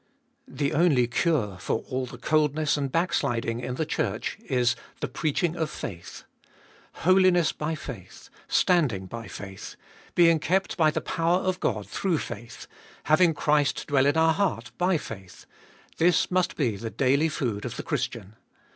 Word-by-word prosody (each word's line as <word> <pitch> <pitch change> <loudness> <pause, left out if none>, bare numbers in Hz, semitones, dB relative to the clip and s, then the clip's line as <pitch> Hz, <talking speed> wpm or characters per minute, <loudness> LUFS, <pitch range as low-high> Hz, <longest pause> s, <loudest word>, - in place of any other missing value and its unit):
1. - - -14
The 140 -1 0
only 150 -6 +4
cure 120 - 0
for 110 - -1
all 130 0 -2
the 120 - -10
coldness 150 +2 +1
and 140 -3 -2
backsliding 120 -9 0
in 125 0 -4
the 160 - -1
Church 155 - -2
is 125 -3 +2 0.2
"the - - -2
preaching 160 +2 -1
of 160 -3 -2
faith." 85 - -8 0.8
Holiness 185 -2 +5
by 155 +1 -3
faith, 115 - -10 0.2
standing 140 - +2
by 115 +4 -7
faith, 95 -1 -8 0.4
being 165 -2 +5
kept 190 +5 0
by 160 -3 +4
the - - -2
power 165 +2 +1
of 185 -1 -1
God - - -1
through 185 -4 0
faith, 115 -3 -7 0.4
having 160 +2 +4
Christ 150 -1 +1
dwell 140 -2 +3
in 145 - +2
our 160 0 +4
heart 125 - -1
by 180 0 +3
faith,— 95 - -10 0.5
this 175 +2 +3
must 185 -1 +1
be 120 -9 0
the 115 +2 -5
daily 140 +6 +2
food 115 -8 -2
of - - -5
the - - -4
Christian. 100 +3 -3
150 Hz, 160 wpm, -26 LUFS, 120-165 Hz, 0.8 s, Holiness